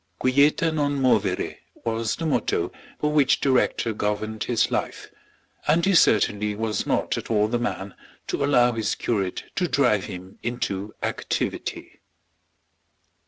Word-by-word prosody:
Quieta 145 +5 +3
non 145 -2 0
movere 105 -8 +1 0.3
was 115 -1 -1
the 165 - -4
motto 155 - 0 0.3
by 150 - 0
which 140 -2 +3
the 135 - +2
rector 115 -3 +1
governed 105 +1 -2
his 120 -2 +1
life, - - -3 0.6
and 165 +4 +3
he 195 - +3
certainly 105 - +3
was 110 -1 -2
not - - 0
at - - -10
all 105 -2 +3
the 120 +2 -1
man 100 -4 -3 0.3
to 140 - -2
allow 125 -4 +4
his 110 -3 -1
curate 100 -6 -2
to 180 - +1
drive 125 - +2
him 90 +1 -9
into 105 -4 -3
activity. - - -3
115 Hz, 140 wpm, -24 LUFS, 105-140 Hz, 0.6 s, allow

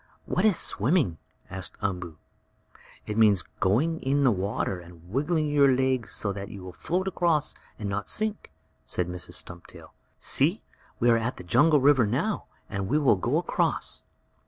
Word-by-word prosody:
"What 185 - 0
is 210 -5 +4
swimming?" 110 - +2 0.3
asked 95 -1 -6
Umboo. 90 -5 -3 0.9
"It 105 +1 -2
means 105 -5 +5 0.2
going 135 - +2
in 140 +2 +1
the 130 - +5
water, 95 -1 -2
and 85 -1 -15
wiggling 150 +5 +1
your 145 -2 +4
legs 130 -3 0
so 100 -2 -1
that 100 0 -6
you 100 -3 -9
will 90 -1 -8
float 185 - -2
across 170 -5 +1 0.2
and 105 - -4
not 100 +1 -3
sink," 215 -1 0 0.3
said 90 - -2
Mrs. 90 0 -5
Stumptail. 85 0 -8 0.2
"See, - - +1 0.4
we 120 - +2
are 115 - +4
at 115 +3 -3
the - - -8
jungle 145 - +4
river 135 -5 +5
now, 145 - -1 0.2
and 100 -1 -3
we 145 - +2
will 140 -7 +4
go 95 - 0
across." - - -1
115 Hz, 165 wpm, -27 LUFS, 95-150 Hz, 0.9 s, means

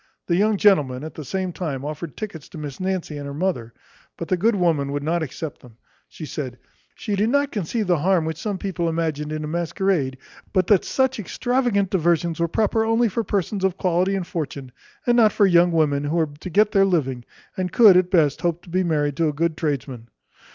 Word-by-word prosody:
The 170 - +1
young 210 +3 +2
gentleman, 145 -11 +3
at 155 - -7
the 155 - -7
same 185 +5 -3
time, 145 -7 -4
offered 150 +1 -6
tickets 185 -9 -7
to - - -10
Miss 145 -3 -7
Nancy 185 -5 -3
and 140 - -6
her 140 - -6
mother; 150 -9 -2 0.5
but 170 - -6
the 185 - +3
good 215 +5 +2
woman 160 -7 +1
would 145 0 -3
not 165 +3 0
accept 155 0 -6
them. 120 -3 -17 0.3
She 160 - -9
said, 130 -5 -5 0.4
"she 205 - -3
did 210 +3 +1
not 285 +2 +1
conceive 210 +3 -2
the 175 -4 +2
harm 175 0 +2
which 160 -1 -3
some 205 -3 -2
people 175 -3 -2
imagined 155 -2 -2
in 155 0 -3
a - - -4
masquerade; 170 -4 -1 0.4
but 185 -1 +3
that 200 -1 +4
such 265 -2 0
extravagant 235 -2 0
diversions 170 -2 +1
were 170 - +2
proper 220 +5 +1
only 225 +1 +2
for 230 +4 -2
persons 200 0 -2
of 190 -1 +1
quality 185 +2 +1
and 190 -2 -2
fortune, 140 -6 -5 0.3
and 240 - +3
not 220 -3 +6
for 205 - +4
young 175 -1 +4
women 145 -3 +1
who 150 +3 -1
were 160 -3 +1
to 185 - -7
get 210 +4 +3
their 195 -2 +4
living, 135 -10 0 0.3
and 185 -2 -2
could, 210 -3 +7
at 180 0 +3
best, 165 -4 +2
hope 175 -1 -1
to - - -15
be 185 +1 +1
married 150 -4 0
to 165 - +2
a 150 - -1
good 165 +2 0
tradesman." 135 -7 -3
170 Hz, 220 wpm, -22 LUFS, 150-195 Hz, 0.5 s, could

